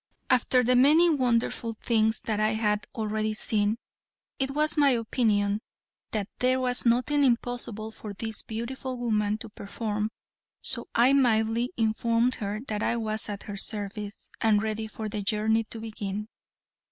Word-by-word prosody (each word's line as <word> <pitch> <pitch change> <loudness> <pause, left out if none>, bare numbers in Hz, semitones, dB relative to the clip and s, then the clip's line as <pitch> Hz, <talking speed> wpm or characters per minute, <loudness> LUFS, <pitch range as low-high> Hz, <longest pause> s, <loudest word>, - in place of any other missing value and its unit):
After 250 0 +4
the 250 +1 +3
many 310 +7 +6
wonderful 235 -4 0
things 220 0 +1
I 215 0 +1
had 210 -1 0
already 215 -1 -1
seen 215 0 +1 0.6
it 265 0 +1
was 300 +2 +1
my 290 -2 +5
opinion 215 -4 +1 0.5
that 210 -3 -1
there 255 +1 +3
was 250 -1 +1
nothing 255 +5 +3
impossible 240 -3 0
for 215 -1 -8
this 220 +2 -4
beautiful 255 +3 -5
woman 215 -3 0
to 225 0 -8
perform, 210 +1 -3 0.5
so - - -1
I 245 +4 +5
mildly 235 -2 +3
informed 230 +2 +2
her 210 +1 -2
that 210 -1 -2
I 235 - +1
was 220 -1 -2
at 205 -1 -5
her 205 -2 -6
service, 205 0 -4
and 215 -2 +3
ready 220 0 -2
for 220 0 -6
the 210 0 -3
journey 220 +2 +1
to 225 - -8
begin. 210 -1 -5
220 Hz, 150 wpm, -27 LUFS, 215-245 Hz, 0.6 s, many